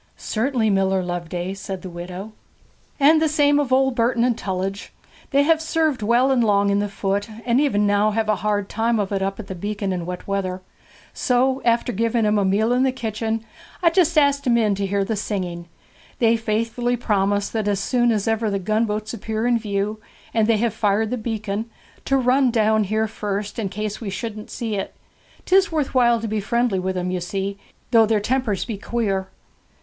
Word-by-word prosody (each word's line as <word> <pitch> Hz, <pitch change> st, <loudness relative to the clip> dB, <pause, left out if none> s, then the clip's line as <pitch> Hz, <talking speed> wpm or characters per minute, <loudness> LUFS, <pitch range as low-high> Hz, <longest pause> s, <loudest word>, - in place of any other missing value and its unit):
'Certainly, 230 Hz, -1 st, 0 dB
Miller 190 Hz, -1 st, +2 dB
Loveday,' 175 Hz, +1 st, -4 dB
said 195 Hz, -1 st, -6 dB
the -, -, -6 dB
widow. 180 Hz, +4 st, -7 dB, 0.7 s
'And 310 Hz, +3 st, +5 dB
the 320 Hz, -, +3 dB
same 290 Hz, -1 st, +3 dB
of 280 Hz, -3 st, -1 dB
old 265 Hz, 0 st, +3 dB
Burden 235 Hz, 0 st, +1 dB
and 245 Hz, -1 st, +2 dB
Tullidge. 195 Hz, -1 st, -4 dB, 0.4 s
They 280 Hz, 0 st, +3 dB
have 320 Hz, +1 st, +3 dB
served 320 Hz, -5 st, 0 dB
well 240 Hz, +5 st, +3 dB
and 250 Hz, -3 st, +3 dB
long 200 Hz, -2 st, +3 dB
in 200 Hz, -, +2 dB
the 205 Hz, 0 st, -1 dB
Foot, 200 Hz, +1 st, -2 dB, 0.2 s
and 245 Hz, +2 st, +3 dB
even 210 Hz, -8 st, +2 dB
now 205 Hz, +1 st, +3 dB
have 220 Hz, 0 st, -1 dB
a 215 Hz, -2 st, +2 dB
hard 205 Hz, 0 st, -1 dB
time 230 Hz, +2 st, 0 dB
of 200 Hz, -1 st, -2 dB
it 195 Hz, -1 st, -1 dB
up 195 Hz, +1 st, -2 dB
at 220 Hz, -, -6 dB
the 195 Hz, -, -6 dB
beacon 200 Hz, +1 st, -3 dB
in 175 Hz, -2 st, -4 dB
wet 180 Hz, 0 st, -6 dB
weather. 190 Hz, -2 st, -2 dB, 0.5 s
So 260 Hz, +1 st, +1 dB
after 235 Hz, +1 st, +2 dB
giving 230 Hz, +2 st, +1 dB
them 210 Hz, 0 st, +2 dB
a -, -, +2 dB
meal 205 Hz, +4 st, +2 dB
in 250 Hz, -, +2 dB
the 265 Hz, 0 st, +3 dB
kitchen 225 Hz, -2 st, -3 dB, 0.4 s
I 335 Hz, -, +5 dB
just 335 Hz, -2 st, +2 dB
asked 280 Hz, -2 st, +3 dB
'em 235 Hz, -1 st, +4 dB
in 215 Hz, -3 st, +2 dB
to 195 Hz, 0 st, -2 dB
hear 200 Hz, 0 st, 0 dB
the 220 Hz, +2 st, -1 dB
singing. 180 Hz, -4 st, -4 dB, 0.5 s
They 230 Hz, -1 st, +4 dB
faithfully 230 Hz, +2 st, -1 dB
promise 205 Hz, -3 st, 0 dB
that 220 Hz, -2 st, -2 dB
as 200 Hz, -2 st, +1 dB
soon 240 Hz, +3 st, +2 dB
as 215 Hz, -1 st, -1 dB
ever 225 Hz, 0 st, +1 dB
the 200 Hz, -, 0 dB
gunboats 215 Hz, +2 st, -1 dB
appear 220 Hz, 0 st, -3 dB
in 240 Hz, -1 st, +3 dB
view, 210 Hz, 0 st, -2 dB, 0.3 s
and 220 Hz, -2 st, +2 dB
they 225 Hz, -1 st, +3 dB
have 230 Hz, 0 st, 0 dB
fired 210 Hz, +1 st, +1 dB
the -, -, +1 dB
beacon, 220 Hz, -1 st, -3 dB, 0.4 s
to 275 Hz, -, +2 dB
run 260 Hz, +1 st, +3 dB
down 220 Hz, -2 st, +2 dB
here 220 Hz, +2 st, 0 dB
first, 205 Hz, 0 st, -4 dB
in 205 Hz, -4 st, -2 dB
case 210 Hz, +3 st, -4 dB
we 215 Hz, -, -4 dB
shouldn't 215 Hz, +1 st, -6 dB
see 225 Hz, -2 st, -4 dB
it. 195 Hz, -, -5 dB, 0.5 s
'Tis 385 Hz, +1 st, +4 dB
worth 305 Hz, -4 st, -1 dB
while 240 Hz, -2 st, +4 dB
to 225 Hz, -, -4 dB
be 215 Hz, 0 st, -1 dB
friendly 235 Hz, -1 st, 0 dB
with 185 Hz, 0 st, -2 dB
'em, 180 Hz, 0 st, -2 dB
you 180 Hz, -1 st, -2 dB
see, 195 Hz, +2 st, -3 dB, 0.3 s
though 225 Hz, -2 st, +6 dB
their 220 Hz, -1 st, +2 dB
tempers 225 Hz, -2 st, -1 dB
be 215 Hz, -5 st, -5 dB
queer.' 200 Hz, -5 st, -1 dB
215 Hz, 205 wpm, -22 LUFS, 200-240 Hz, 0.7 s, though